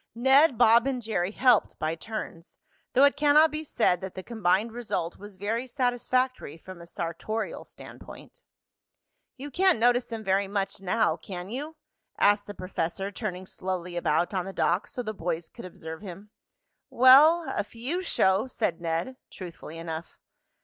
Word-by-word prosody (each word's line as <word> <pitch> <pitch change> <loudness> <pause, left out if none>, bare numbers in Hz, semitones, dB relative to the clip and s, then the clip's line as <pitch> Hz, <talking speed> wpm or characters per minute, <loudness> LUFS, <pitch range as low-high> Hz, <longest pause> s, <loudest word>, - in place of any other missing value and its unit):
Ned, 265 +3 +5
Bob 230 +4 +5
and 265 -2 -1
Jerry 210 -6 -1
helped 240 +1 +3
by 155 +1 -1
turns, 170 -2 -7 0.4
though 260 - +5
it 285 - +5
cannot 300 +2 +5
be 305 +1 -4
said 200 - +1
that 190 -1 -7
the 185 - -6
combined 215 0 0
result 220 -8 -4
was 205 0 -11
very 225 +6 -3
satisfactory 255 - -1
from 185 +1 -11
a 170 - -12
sartorial 170 +7 -4
standpoint. - - -13 1.0
"You 285 +2 -8
can't 375 +1 +3
notice 245 +2 +3
them 225 -2 -6
very 195 0 +1
much 195 -1 -3
now; 220 +4 +1
can 185 0 -8
you?" 295 +6 -5 0.4
asked 205 0 +3
the 205 - -7
professor, 185 +1 -3
turning 190 -3 -5
slowly 180 -2 -5
about 175 +1 0
on 185 -2 -1
the 195 - -7
dock - - 0
so 245 - -5
the 215 -1 -4
boys 170 -3 -4
could 235 - -11
observe 160 -2 -9
him. 200 +1 -10 0.6
"Well, 295 +7 +6
a 205 - 0
few 245 - -4
show," 190 - +1
said 195 -10 -2
Ned, 170 +10 -2
truthfully 170 -3 -9
enough. 165 0 -7
210 Hz, 160 wpm, -27 LUFS, 180-250 Hz, 1.0 s, Well